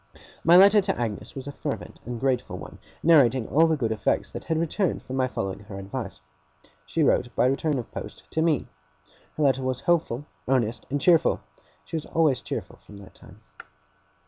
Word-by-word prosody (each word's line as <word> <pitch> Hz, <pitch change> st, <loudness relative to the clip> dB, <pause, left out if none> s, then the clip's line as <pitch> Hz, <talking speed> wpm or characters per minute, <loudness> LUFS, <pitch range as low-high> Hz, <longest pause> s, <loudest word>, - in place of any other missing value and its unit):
My 170 Hz, +2 st, +7 dB
letter 200 Hz, +2 st, +7 dB
to 195 Hz, -5 st, -2 dB
Agnes 115 Hz, -4 st, -4 dB
was 135 Hz, 0 st, -7 dB
a -, -, -4 dB
fervent -, -, -6 dB
and 120 Hz, -1 st, -4 dB
grateful 130 Hz, -1 st, -1 dB
one, -, -, -10 dB, 0.2 s
narrating 135 Hz, -7 st, +5 dB
all 160 Hz, +4 st, +4 dB
the 160 Hz, -1 st, +1 dB
good 115 Hz, -5 st, -1 dB
effects 110 Hz, -, 0 dB
that -, -, -7 dB
had 160 Hz, -, 0 dB
resulted 170 Hz, +2 st, -1 dB
from 130 Hz, -, -6 dB
my 130 Hz, -1 st, +2 dB
following 95 Hz, -6 st, -4 dB
her 100 Hz, -1 st, -10 dB
advice. 100 Hz, -, -6 dB, 0.7 s
She 160 Hz, -, 0 dB
wrote, 130 Hz, -, +3 dB
by -, -, +3 dB
return 140 Hz, +3 st, +1 dB
of 120 Hz, -, -6 dB
post, -, -, -8 dB
to 160 Hz, -, 0 dB
me. 160 Hz, -5 st, +2 dB, 0.7 s
Her 155 Hz, -, +1 dB
letter 135 Hz, -2 st, +3 dB
was 130 Hz, -1 st, -2 dB
hopeful, 155 Hz, -6 st, 0 dB, 0.2 s
earnest, 120 Hz, -3 st, 0 dB
and 145 Hz, +2 st, -1 dB
cheerful. 170 Hz, +1 st, +3 dB, 0.4 s
She -, -, -7 dB
was 155 Hz, -, -6 dB
always 155 Hz, -6 st, +2 dB
cheerful -, -, -6 dB
from 105 Hz, -, -15 dB
that 100 Hz, -1 st, -13 dB
time. -, -, -17 dB
135 Hz, 190 wpm, -26 LUFS, 120-160 Hz, 0.7 s, My